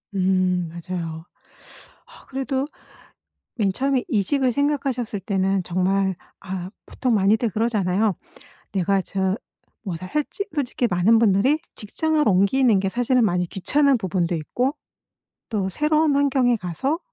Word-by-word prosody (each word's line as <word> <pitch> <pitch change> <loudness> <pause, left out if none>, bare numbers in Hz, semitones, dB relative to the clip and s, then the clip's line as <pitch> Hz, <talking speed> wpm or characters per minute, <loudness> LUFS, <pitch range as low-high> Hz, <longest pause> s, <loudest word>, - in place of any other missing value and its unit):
음 185 -2 +1
맞아요. 170 -1 -6 0.8
아 - - -17
그래도 270 +1 -2 0.9
맨 205 -5 +1
처음에 270 0 +1
이직을 255 - +1
생각하셨을 265 -5 -1
때는 195 0 0
정말 190 +2 0 0.2
아 185 -2 -5 0.2
보통 255 -2 0
많이들 215 +3 +3
그러잖아요. 210 -2 +1 0.6
내가 195 0 +1
저 190 +2 -1 0.5
뭐 185 - -3
다 175 +3 -7
했지 300 - -2
솔직히 250 -4 0
많은 195 +4 +4
분들이 225 +7 +3 0.2
직장을 310 +9 0
옮기는 205 +3 +4
게 195 - 0
사실은 245 +2 +2
많이 180 -3 0
귀찮은 275 - +2
부분도 180 -4 -1
있고 250 - -1 0.7
또 200 -4 -1
새로운 300 - +2
환경에 265 -3 +3
가서 230 - -2
205 Hz, 275 characters per minute, -23 LUFS, 185-265 Hz, 0.9 s, 많은